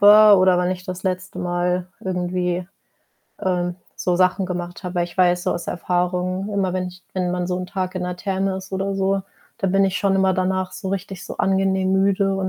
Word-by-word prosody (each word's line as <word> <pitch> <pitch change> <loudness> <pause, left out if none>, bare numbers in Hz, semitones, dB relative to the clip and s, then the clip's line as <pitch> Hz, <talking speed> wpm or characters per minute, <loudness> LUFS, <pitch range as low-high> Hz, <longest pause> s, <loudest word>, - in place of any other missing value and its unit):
war 210 0 +9
oder 185 -1 +5
wann 180 0 +1
ich 180 -1 -4
das 185 0 -6
letzte 185 -1 -3
Mal 180 0 -1
irgendwie, 180 -1 -1 0.7
ähm, 180 -2 0 0.2
so 180 -1 0
Sachen 185 +1 +2
gemacht 175 0 -5
habe. 180 0 -4
Weil 175 -1 +2
ich 175 +2 -11
weiß, 180 -1 +4
so - - +2
aus 175 -1 -5
Erfahrung, 180 +2 -1
immer 190 -2 +1
wenn 185 -1 -1
ich 180 0 -14
wenn 180 -1 -1
man 180 0 -1
so 180 0 -1
'n 185 - -4
Tag 185 -1 -3
in 180 - -2
der 180 0 -3
Therme 190 0 -1
ist 190 0 -9
oder 195 +1 -1
so, 195 0 +1 0.4
dann 190 -2 0
bin 195 0 +4
ich 190 -1 0
schon 195 -1 +2
immer 190 0 +3
danach 185 0 0
so 195 - -5
richtig 190 -1 -4
so - - -7
angenehm 190 0 +2
müde 195 0 +2
und 190 -1 -1
185 Hz, 215 wpm, -22 LUFS, 180-190 Hz, 0.7 s, war